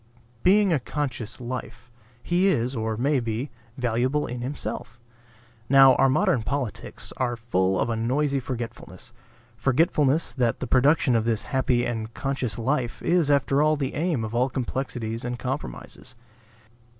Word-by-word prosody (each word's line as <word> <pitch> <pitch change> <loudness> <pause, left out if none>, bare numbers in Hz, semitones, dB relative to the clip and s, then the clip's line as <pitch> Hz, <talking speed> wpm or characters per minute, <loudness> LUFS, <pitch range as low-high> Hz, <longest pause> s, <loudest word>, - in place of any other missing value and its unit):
Being 195 0 +4
a 150 - +2
conscious 125 -5 -4
life, 125 0 -7 0.3
he 180 +3 +2
is, 130 -8 +1
or 110 -1 -2
may 140 +3 +2
be, 115 +3 -3 0.3
valuable 125 +4 0
in 120 0 -5
himself. 125 -2 -5 0.7
Now 135 -1 +8
our 135 +1 +4
modern 155 - +2
politics 130 -3 -4
are 125 -2 0
full 95 -5 0
of - - +1
a 115 - -1
noisy 135 +5 0
forgetfulness; 120 -7 -7 0.4
forgetfulness 140 +3 +2
that 125 -3 0
the - - -3
production 135 0 +3
of 115 -1 +1
this 115 -2 0
happy 130 -2 +1
and 115 -2 -3
conscious 130 -6 -2
life 125 0 -1
is 170 -4 +2
after 140 0 +3
all 155 0 +4
the 140 -3 -3
aim 155 -6 0
of 110 0 -5
all 125 +3 +2
complexities 125 -3 -3
and 120 0 -3
compromises. 125 - -6
125 Hz, 150 wpm, -25 LUFS, 115-140 Hz, 0.7 s, Now